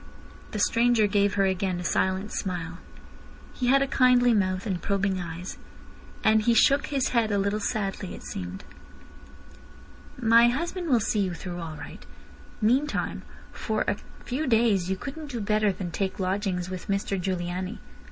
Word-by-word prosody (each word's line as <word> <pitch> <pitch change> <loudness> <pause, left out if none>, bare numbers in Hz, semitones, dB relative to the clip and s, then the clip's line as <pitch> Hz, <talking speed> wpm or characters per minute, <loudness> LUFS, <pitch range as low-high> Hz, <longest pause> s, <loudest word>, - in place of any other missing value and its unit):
The - - -5
stranger 230 +1 +3
gave 200 0 +2
her 195 -1 +3
again 190 -1 0
a - - -5
silent 190 +4 0
smile. 175 -2 -4 0.7
He 250 - -2
had 275 +2 +5
a - - -2
kindly 250 -2 +4
mouth 185 -2 0
and 190 -5 -2
probing 195 -1 0
eyes. 170 +1 -7 0.6
And 220 0 +5
he 235 +2 +3
shook 275 +5 +4
his 275 -3 0
head 230 -3 +1
a 205 - +2
little 200 +2 0
sadly, 195 -3 -3
it - - -11
seemed. 90 -1 -6 1.5
"My 235 -1 +6
husband 340 +7 -2
will 245 -4 +4
see 215 0 0
you 185 -3 0
through 175 +1 -6
all 165 -2 -6
right. 145 - -10 0.6
Meantime 265 +7 +1 0.3
for 215 -2 -2
a - - +2 0.3
few 275 +5 -2
days 220 -6 +3
you 190 - 0
couldn't 290 +6 -7
do 245 -4 -4
better 210 0 +2
than 185 -2 -5
take 190 +3 -2
lodgings 185 -1 -1
with 185 -1 -6
Mr 195 -1 -1
Giugliani. 185 +2 -3
200 Hz, 160 wpm, -26 LUFS, 185-235 Hz, 1.5 s, My